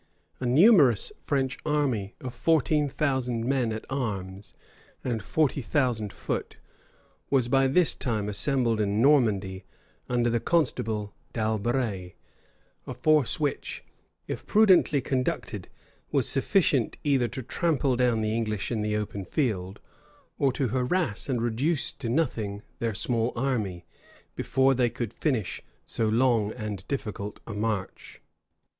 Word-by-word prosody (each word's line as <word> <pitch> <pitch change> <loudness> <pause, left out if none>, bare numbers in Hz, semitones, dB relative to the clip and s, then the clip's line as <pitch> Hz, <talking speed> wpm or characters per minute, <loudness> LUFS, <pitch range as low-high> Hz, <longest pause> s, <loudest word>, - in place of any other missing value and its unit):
A 125 - -2
numerous 145 - +5
French 135 -3 -1
army 130 -9 0
of 125 -2 -6
fourteen 150 +2 +2
thousand 130 -5 -1
men 130 -3 +1
at 110 0 -5
arms 100 -7 -4 0.5
and 120 -4 -2
forty 145 +5 0
thousand 120 -5 0
foot, - - -4 0.7
was 130 -4 +2
by 135 +1 +3
this 165 +5 +4
time 110 -5 -2
assembled 115 +1 +1
in 100 0 0
Normandy 105 -9 +3 0.5
under 120 -1 +1
the 120 - +1
constable 110 -8 0 0.2
D'Albret; 110 -4 -1 0.7
a - - -4
force 155 -6 +2
which, 145 -2 -2 0.4
if - - -5
prudently 185 -9 +5
conducted, 130 0 -2 0.4
was - - +1
sufficient - - +2
either 135 -4 +2
to 130 - -6
trample 140 -1 0
down 120 -2 +2
the 110 0 0
English 110 -2 -2
in 110 -3 -1
the 105 0 0
open 105 -2 -4
field, 100 -6 -2 0.6
or 135 - +3
to 130 -1 -1
harass 130 - 0
and 120 -3 0
reduce 130 +6 +1
to 115 - -6
nothing 110 -8 -1 0.2
their 115 -3 -1
small 115 +3 +1
army, 110 -9 -2 0.5
before 135 +1 +2
they 125 -2 +2
could 115 -1 -5
finish 120 - -1 0.2
so 110 -1 -1
long 115 -2 +2
and 105 -5 -6
difficult 105 -6 -4
a 115 - -6
march. 105 -2 -3
120 Hz, 130 wpm, -27 LUFS, 105-135 Hz, 0.7 s, numerous